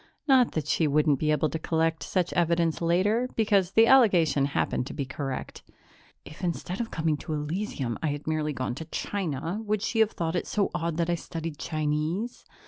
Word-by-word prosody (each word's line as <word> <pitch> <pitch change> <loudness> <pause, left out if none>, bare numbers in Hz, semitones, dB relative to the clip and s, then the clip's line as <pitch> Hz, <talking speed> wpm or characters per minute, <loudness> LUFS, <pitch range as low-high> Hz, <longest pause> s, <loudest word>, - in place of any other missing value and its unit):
Not 260 -4 +5
that 155 - -2
she 160 - +1
wouldn't 150 -1 +2
be 155 - 0
able 155 0 +2
to 160 - -3
collect 160 0 0
such 180 -2 -1
evidence 170 -1 +1
later, 200 +9 +2
because 200 -4 +2
the 225 - +6
allegation 175 - +5
happened 140 -2 -1
to - - -7
be 140 - -2
correct. 135 +1 -5 0.6
_If, 155 +5 -11
instead 180 +3 -2
of 230 - -4
coming 160 -2 0
to 155 - -5
Elysium, 150 - -3
I 160 - 0
had 145 0 -3
merely 155 -1 -1
gone 130 -3 -3
to 160 +6 -7
China, 170 +1 -3
would 215 -1 -1
she 225 - -1
have 220 -1 +5
thought 165 0 -2
it 175 - -1
so 205 -2 0
odd 170 -2 -2
that 170 0 +1
I - - +2
studied 165 -2 -5
Chinese? 155 +8 -2
165 Hz, 195 wpm, -27 LUFS, 150-195 Hz, 0.6 s, the